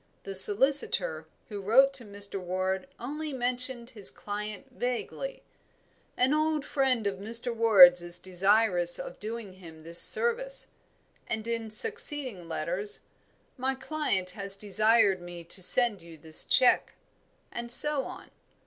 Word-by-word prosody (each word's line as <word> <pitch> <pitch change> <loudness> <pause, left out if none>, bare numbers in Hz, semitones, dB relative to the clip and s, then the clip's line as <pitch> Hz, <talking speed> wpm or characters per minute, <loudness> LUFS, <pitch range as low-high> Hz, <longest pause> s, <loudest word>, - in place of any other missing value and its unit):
The 195 - -8
solicitor 265 - +5 0.2
who 205 -2 -8
wrote 265 +7 +2
to 265 -3 -1
Mr. 200 -1 -6
Ward 185 +4 -4
only 300 +5 -7
mentioned 250 -1 -2
his 210 -5 -3
client 210 +3 -8
vaguely 250 - -6 0.7
"an 255 +3 +1
old 310 -1 -2
friend 260 -5 -1
of 195 -2 -4
Mr. 230 +4 -1
Ward's 190 -6 +5
is 175 0 -5
desirous 185 -1 +2
of - - -9
doing 220 -2 -8
him 165 -4 -16
this 170 +1 +3
service;" - - 0 0.6
and 220 0 -6
in 230 -1 -5
succeeding 275 - -1
letters, 175 +6 -3 0.6
"My 265 +1 -3
client 265 -9 -3
has 195 +1 -3
desired 210 -1 +1
me 175 -1 -11
to 175 +3 -1
send 225 0 +2
you 165 -1 -15
this 155 +1 +1
cheque;" 250 - +1 0.6
and 235 0 -6
so 280 +2 +6
on. - - -12
220 Hz, 135 wpm, -26 LUFS, 190-260 Hz, 0.7 s, so